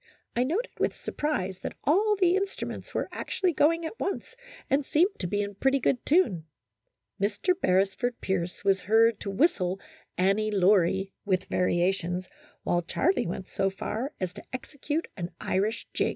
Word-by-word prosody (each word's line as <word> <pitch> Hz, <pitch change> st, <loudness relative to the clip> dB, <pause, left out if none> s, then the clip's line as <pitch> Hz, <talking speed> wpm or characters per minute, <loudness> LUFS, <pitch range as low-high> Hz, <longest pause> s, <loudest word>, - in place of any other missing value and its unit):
I 240 Hz, -, +3 dB
noted 360 Hz, -, -1 dB
with -, -, +1 dB
surprise 190 Hz, -12 st, -2 dB
that -, -, -6 dB
all 415 Hz, +9 st, +3 dB
the 365 Hz, -2 st, +3 dB
instruments 390 Hz, 0 st, -3 dB
were -, -, 0 dB
actually 365 Hz, -3 st, -1 dB
going 330 Hz, +3 st, +3 dB
at 320 Hz, -, -6 dB
once 400 Hz, +4 st, -3 dB, 0.3 s
and 280 Hz, +2 st, +2 dB
seemed 345 Hz, +9 st, +2 dB
to 180 Hz, -, -2 dB
be 205 Hz, +3 st, 0 dB
in 200 Hz, 0 st, -5 dB
pretty 270 Hz, +7 st, +2 dB
good 250 Hz, 0 st, +1 dB
tune. 280 Hz, -, +3 dB, 0.8 s
Mr. 210 Hz, -, +2 dB
Beresford 195 Hz, +6 st, +1 dB
Pierce 180 Hz, -1 st, -2 dB
was 195 Hz, -1 st, +3 dB
heard 225 Hz, +2 st, +4 dB
to 200 Hz, -, -5 dB
whistle 195 Hz, -, +2 dB, 0.2 s
" -, -, -37 dB
Annie 200 Hz, +4 st, +2 dB
Laurie 195 Hz, -1 st, +3 dB
" -, -, -57 dB
with 185 Hz, -2 st, +1 dB
variations, 180 Hz, 0 st, 0 dB, 0.4 s
while 175 Hz, -, +1 dB
Charlie 310 Hz, -, +1 dB
went 180 Hz, +2 st, -4 dB
so 195 Hz, -, 0 dB
far 225 Hz, +7 st, -4 dB
as 185 Hz, -1 st, -2 dB
to -, -, -10 dB
execute 290 Hz, +4 st, -3 dB
an 175 Hz, -2 st, -3 dB
Irish 210 Hz, +5 st, -1 dB
jig. -, -, +1 dB
210 Hz, 165 wpm, -28 LUFS, 190-300 Hz, 0.8 s, heard